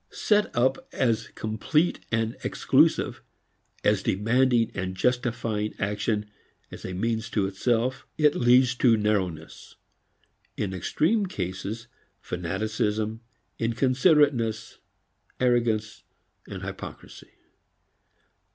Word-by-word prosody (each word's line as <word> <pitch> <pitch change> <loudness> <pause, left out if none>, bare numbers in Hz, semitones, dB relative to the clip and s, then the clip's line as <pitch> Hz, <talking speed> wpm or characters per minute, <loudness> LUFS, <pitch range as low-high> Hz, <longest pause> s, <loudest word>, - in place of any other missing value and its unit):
Set 210 0 +1
up 130 +2 +1
as 115 -4 0
complete 130 +10 0
and 115 0 0
exclusive, - - +2 0.6
as 105 -2 +3
demanding 115 +4 +2
and 95 -1 -4
justifying 115 -1 -1
action 105 +1 -1 0.5
as - - -10
a - - -5
means 110 +3 -2
to 100 -3 0
itself, 120 +6 -1
it 150 -2 +4
leads 125 +1 +4
to 120 -2 +4
narrowness; 95 -7 -2 0.8
in 100 -3 -2
extreme 180 - +1
cases 100 - -5 0.3
fanaticism, 105 +4 -2 0.4
inconsiderateness, 130 0 +2 0.6
arrogance 115 -4 +1 0.5
and - - -7
hypocrisy. - - -9
115 Hz, 90 wpm, -26 LUFS, 105-125 Hz, 0.8 s, it